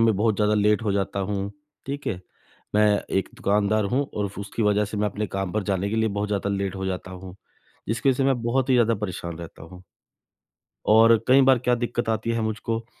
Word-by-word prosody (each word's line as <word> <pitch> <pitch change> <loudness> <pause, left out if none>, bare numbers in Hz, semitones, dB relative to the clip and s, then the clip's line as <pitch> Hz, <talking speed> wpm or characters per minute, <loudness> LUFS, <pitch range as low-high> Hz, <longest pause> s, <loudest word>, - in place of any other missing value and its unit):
में 115 -2 +4
बहुत 110 0 +1
ज़्यादा 105 0 +2
लेट 105 +1 +2
हो 105 -3 0
जाता 100 0 -1
हूँ। 100 0 -2 0.4
ठीक 140 +1 -5
है। 90 - -2 0.5
मैं 105 0 +5 0.3
एक 95 - -3
दुकानदार 105 +1 +1
हूँ 140 +2 +1
और 100 -2 -2
उसकी 100 +3 -4
वजह 105 0 +3
से 105 +1 -6
मैं 105 - +1
अपने 105 +1 -3
काम 95 -2 -4
पर 110 -1 0
जाने 100 0 -1
के 110 - -1
लिए 110 0 +2
बहुत 105 0 -2
ज़्यादा 100 -1 -1
लेट 100 -1 -2
हो 95 - -3
जाता 95 0 -4
हूँ। 95 0 -10 0.5
जिसकी 115 +5 0
वजह 130 - +3
से 135 - +1
मैं 130 -3 +1
बहुत 125 +3 0
ही - - +5
ज़्यादा 115 -2 +3
परेशान 90 -5 -5
रहता 85 -2 -10
हूँ। 90 +3 -12 1.1
और 115 +1 +7
कई 130 +2 +6
बार 130 -1 +5
क्या 125 0 +2
दिक्कत 120 -1 -2
आती 110 +1 -1
है 115 0 -1
मुझको 115 +1 -3
105 Hz, 220 wpm, -24 LUFS, 100-115 Hz, 1.1 s, और